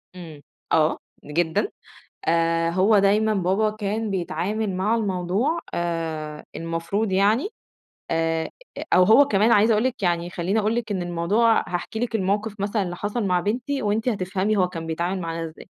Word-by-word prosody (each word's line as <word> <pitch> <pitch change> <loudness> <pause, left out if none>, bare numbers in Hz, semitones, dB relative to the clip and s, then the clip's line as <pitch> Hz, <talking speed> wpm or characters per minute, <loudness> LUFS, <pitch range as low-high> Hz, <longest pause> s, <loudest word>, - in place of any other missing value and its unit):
إمم، 160 -5 -10 0.3
آه، 155 -1 +3 0.3
جدًا 160 +2 0 0.6
آآ، 165 0 +2
هو 195 +5 +4
دايمًا 210 +2 +3
بابا 195 +3 +1
كان 215 +1 -3
بيتعامل 195 +3 -2
مع 200 +5 +1
الموضوع 205 - 0
آآ 160 -3 -3
المفروض 165 +6 -2
يعني 210 - +3 0.6
آآ، 165 0 0 0.4
أو 180 - +7
هو 220 +9 +7
كمان 215 0 +3
عايزة 220 +1 +5
أقول 215 +1 +2
لِك 250 -4 -2
يعني 175 -1 0
خلّيني 185 +4 -1
أقول 215 +2 0
لِك 230 -2 -3
إن 190 -3 -1
الموضوع 175 +7 +2
هاحكي 175 +5 -4
لِك 240 -1 -2
الموقف 205 +1 -1
مثلًا 205 +1 0
اللي 175 -1 -5
حصل 205 +5 -3
مع 180 -2 +2
بنتي 245 +9 -2
وأنتِ 215 +3 0
هتفهمي 195 0 -1
هو 185 -2 +3
كان 165 -2 -7
بيتعامل 175 +4 -2
معانا 165 -1 -3
إزاي، 160 0 -10
195 Hz, 160 wpm, -23 LUFS, 170-215 Hz, 0.6 s, أو